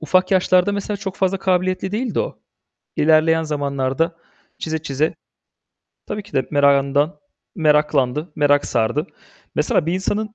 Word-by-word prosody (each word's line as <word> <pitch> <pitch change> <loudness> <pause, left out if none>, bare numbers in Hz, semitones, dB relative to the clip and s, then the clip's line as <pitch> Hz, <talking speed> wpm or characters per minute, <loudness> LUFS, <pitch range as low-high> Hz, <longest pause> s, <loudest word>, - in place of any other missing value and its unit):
Ufak 185 +4 +2
yaşlarda 185 0 +3
mesela 200 +1 -3
çok 195 -1 -6
fazla 190 0 0
kabiliyetli 185 +1 0
değildi 230 0 -1
o. - - -5 0.6
İlerleyen 160 +1 +3
zamanlarda 145 +1 -1 0.4
çize 160 -1 -2
çize 150 +1 -1 0.9
tabii 210 - -4
ki 205 - -18
de 135 -2 0
merakından, 140 +2 +2 0.3
meraklandı, 150 - +1
merak 145 -1 +3
sardı. 120 +9 0 0.5
Mesela 160 - +1
bir 170 - 0
insanın 210 +3 -2
160 Hz, 130 wpm, -20 LUFS, 145-185 Hz, 0.9 s, yaşlarda